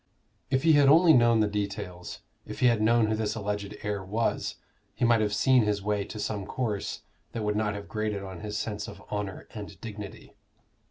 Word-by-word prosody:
If 130 -1 +1
he 160 -1 +6
had 145 -2 +6
only 165 +2 +7
known 120 -3 +5
the 105 - +3
details, 100 -3 -4 0.3
if - - -7
he - - +3
had 115 -3 +4
known 115 +1 +4
who 110 0 0
this 110 -1 -1
alleged 105 -1 -3
heir 105 -2 -2
was, 110 +5 -1 0.4
he - - +1
might 115 -2 +4
have 105 -1 +1
seen 125 +5 +4
his 105 -2 0
way 105 -1 0
to 110 - -8
some 105 -2 -3
course 105 -5 -3 0.3
that 115 - -3
would 105 0 0
not 105 -1 0
have 100 -1 -7
grated 105 -2 -2
on 95 -2 -7
his 105 0 -4
sense 105 -1 -3
of 100 0 -10
honor 105 -2 -4
and 105 -2 -8
dignity. 105 -3 -8
105 Hz, 205 wpm, -28 LUFS, 100-115 Hz, 0.4 s, only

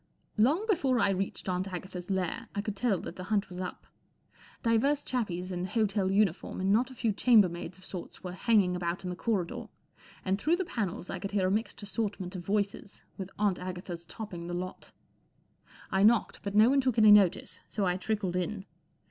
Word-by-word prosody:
L 220 - +7
ONG 335 +10 +1
before 275 - +2
I 200 - +4
reached 195 +1 -3
Aunt 185 +1 -1
Agatha's 180 0 -6
u 195 - +1
lair 190 +6 -2
I 200 - 0
could 210 -1 -4
tell 210 -2 +1
that - - -8
the 185 - -6
hunt 205 0 0
was 180 0 -7
up. 180 -1 -6 0.8
Divers 270 +5 +2
chappies 190 -7 -2
in 180 0 -2
hotel 200 -1 +1
uniform 195 -3 +1
and 190 +1 +1
not 240 +4 +3
a 260 - -11
few 230 -3 0
chambermaids 190 -7 +3
of 185 - -16
sorts 180 -3 -8
were 180 - -4
hanging 190 -1 +3
about 175 +1 -2
in 180 - -3
the - - -4
corridor, 190 -4 -2 0.6
and 190 +1 +1
through 320 +8 +3
the 375 +1 -2
panels 205 - -3
I 190 - -4
could 200 +2 -5
hear 195 -2 +2
a 185 - +2
mixed 215 +1 -2
assortment 200 -3 -3
of 180 - -5
voices, 200 0 -2 0.2
with 190 -1 -4
Aunt 200 -3 +1
Agatha's 180 -1 -6
topping 175 -2 -7
the 175 - -3
lot. 185 +1 -6 1.0
I 190 - +2
knocked, 220 +2 +3
but 200 0 -4
no 220 +4 +7
one 275 0 +4
took 255 -3 0
any 215 -1 +8
notice, 200 -4 +4
so 205 - -1
I 180 -1 +2
trickled 195 -2 -2
in. 190 +2 -2
195 Hz, 205 wpm, -30 LUFS, 180-220 Hz, 1.0 s, any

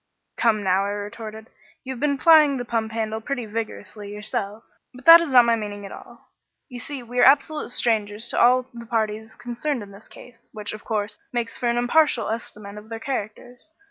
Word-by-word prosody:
"Come, 215 -3 +1
now," 190 0 +2
I - - -2
retorted. 215 +2 -7 0.3
"You 265 0 -5
have 250 - -10
been 285 0 +1
plying 305 -1 +6
the 245 - -4
pump 225 -2 -2
handle 220 0 -3
pretty 250 -1 -4
vigorously 210 -1 -6
yourself. 210 +1 -4 0.3
But 255 - -14
that 330 +1 +10
is 335 - -3
not 245 -2 +7
my 235 0 +3
meaning 205 -2 -6
at 195 - -9
all. - - -14 0.4
You 250 -2 -8
see, 270 +1 -7
we 245 +1 -4
are - - +6
absolute 300 +3 +3
strangers 220 -2 -1
to - - +1
all 250 +1 +5
the 235 -1 -10
parties 220 -1 -2
concerned 245 +1 -4
in 200 - -13
this 200 +2 -15
case, 240 -2 -16
which, 210 -2 -6
of 215 - -9
course, 210 -2 -3
makes 235 -2 -3
for 240 - 0
an 235 - 0
impartial 245 -2 +2
estimate 210 -2 -6
of 215 +1 -16
their 225 0 -6
characters. 245 +2 -6
230 Hz, 205 wpm, -23 LUFS, 210-250 Hz, 0.4 s, that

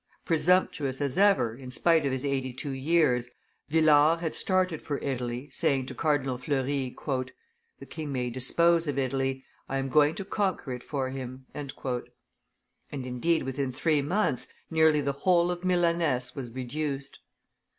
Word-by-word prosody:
Presumptuous 160 -5 +2
as 140 -1 -1
ever, 160 - +3
in 130 0 -10
spite 160 +3 +3
of - - -1
his 130 +1 -3
eighty 135 -2 -1
two 135 +3 -4
years, 135 -3 +2 0.4
Villars 155 +1 +5
had 160 -2 -2
started 185 -4 +1
for 145 - -3
Italy, 125 -1 -3
saying 135 -2 +1
to 130 - -7
Cardinal 135 -2 0
Fleury, 135 -1 -1 0.8
"The - - -11
king 155 -3 -6
may 125 -2 -2
dispose 165 +7 +3
of 145 -2 -2
Italy, 135 0 -1 0.2
I 135 - -1
am 135 0 -2
going 150 +3 +4
to 195 - -5
conquer 190 -10 -1
it 125 - -6
for 135 -1 -3
him." 130 0 -7
And, 145 -2 -6 1.2
indeed, 135 +4 -1
within 135 0 -2
three 150 +3 +1
months, 145 - 0 0.2
nearly 160 -2 +4
the 140 - 0
whole 175 +4 +2
of 175 0 -5
Milaness 170 -8 +1
was 130 -4 -6
reduced. 135 +3 -4
140 Hz, 150 wpm, -28 LUFS, 130-160 Hz, 1.2 s, Villars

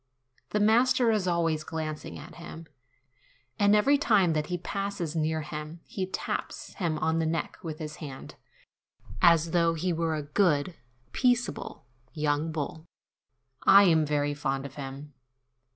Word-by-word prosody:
The 210 - 0
master 235 +3 +4
is 210 -4 0
always 165 -3 +1
glancing 155 -1 -5
at - - -11
him, 165 -1 -9 0.9
and 205 +1 +5
every 275 +7 +4
time 185 - +3
that 150 -1 -1
he 180 - -2
passes 195 -3 -4
near 160 0 0
him 150 +2 -7
he 190 -1 -4
taps - - -4
him 165 -5 -2
on 160 +1 0
the 165 - +1
neck 165 +1 -2
with 160 -4 -6
his 150 -1 -7
hand, 140 -4 -8 0.9
as 170 -2 +5
though 170 -1 +2
he 175 +2 -1
were 165 -1 0
a 150 - -3
good, 150 +1 +1 0.4
peaceable 245 - 0 0.3
young 150 0 0
bull. 160 +1 -5 0.7
I 200 +1 +8
am 165 -4 +4
very 145 -1 0
fond 135 -2 -2
of 135 - -8
him. 140 +1 -8
160 Hz, 150 wpm, -28 LUFS, 150-185 Hz, 0.9 s, I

